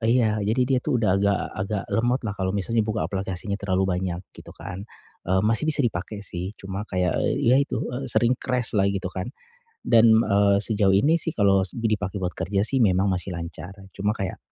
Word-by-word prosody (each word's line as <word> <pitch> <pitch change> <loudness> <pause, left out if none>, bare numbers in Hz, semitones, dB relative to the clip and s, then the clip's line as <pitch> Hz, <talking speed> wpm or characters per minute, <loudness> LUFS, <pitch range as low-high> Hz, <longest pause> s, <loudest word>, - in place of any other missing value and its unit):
iya, 110 -2 +2
jadi 110 +5 +1
dia 130 0 +1
tuh 145 -2 0
udah 110 -5 +2
agak 100 +1 +2 0.2
agak 100 +1 -2
lemotlah 120 -2 0
kalau 95 0 -2
misalnya 110 +4 0
buka 110 0 -1
aplikasinya 95 0 -4
terlalu 95 -1 0 0.2
banyak, 90 -1 -4
gitu - - -13
kan. 90 - -7 0.5
Eee, 95 +1 +3
masih 115 +7 +2
bisa 145 -3 +3
dipakai 100 -1 -3
sih, 90 +3 -5
cuma 95 +2 -6
kayak, 90 -2 0
eee, - - 0 0.2
ya - - +6
itu, 140 - -2
eee, 130 +1 -4
sering 120 +1 +2
crash-lah 115 -6 0
gitu 95 -1 -3
kan. 95 +3 -4 0.5
Dan, 115 -1 +5
eee, 100 -2 +3
sejauh 105 -3 +2
ini 145 +12 +4
sih 165 -1 -3
kalau 100 -3 +3
s - - -8
dipakai 105 -4 -2
buat 90 - 0
kerja 100 +2 -1
sih 125 +6 +1
memang 100 -4 +3
masih 90 0 -2
lancar, 85 +2 -7 0.2
cuma 105 +1 0
kayak 95 -4 -4
100 Hz, 195 wpm, -24 LUFS, 95-115 Hz, 0.5 s, ya